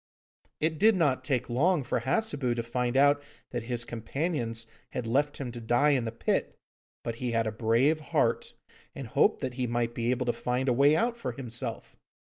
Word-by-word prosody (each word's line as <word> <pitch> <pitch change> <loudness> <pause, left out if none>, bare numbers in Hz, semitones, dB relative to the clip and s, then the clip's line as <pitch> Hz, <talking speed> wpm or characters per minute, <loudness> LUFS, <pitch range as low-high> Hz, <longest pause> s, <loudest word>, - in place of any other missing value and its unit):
It 160 0 0
did 220 +2 +6
not 140 -7 +2
take 130 -2 -1
long 150 +6 +2
for 120 - -1
Hassebu 130 - 0
to 115 - -2
find 120 +2 -1
out 145 +1 +5 0.3
that - - -2
his 120 -1 -1
companions 115 -1 -3 0.3
had 125 - -3
left 145 +6 +1
him 130 -3 -4
to 120 0 -8
die 120 +6 +3
in 130 -4 +1
the 115 - -2
pit, 115 - -1 0.5
but 115 -1 -4
he 125 -1 -2
had 115 0 +2
a 110 - -1
brave 115 +8 +2
heart, 150 - 0 0.4
and - - -6
hoped - - +2
that 125 - -2
he 125 - +1
might 120 0 -1
be 120 0 -1
able 125 0 0
to 120 - +1
find 125 +2 -1
a 125 - +4
way 140 +4 +5
out 235 +6 +1
for 235 - -4
himself. 120 -3 -5
125 Hz, 200 wpm, -29 LUFS, 120-145 Hz, 0.5 s, did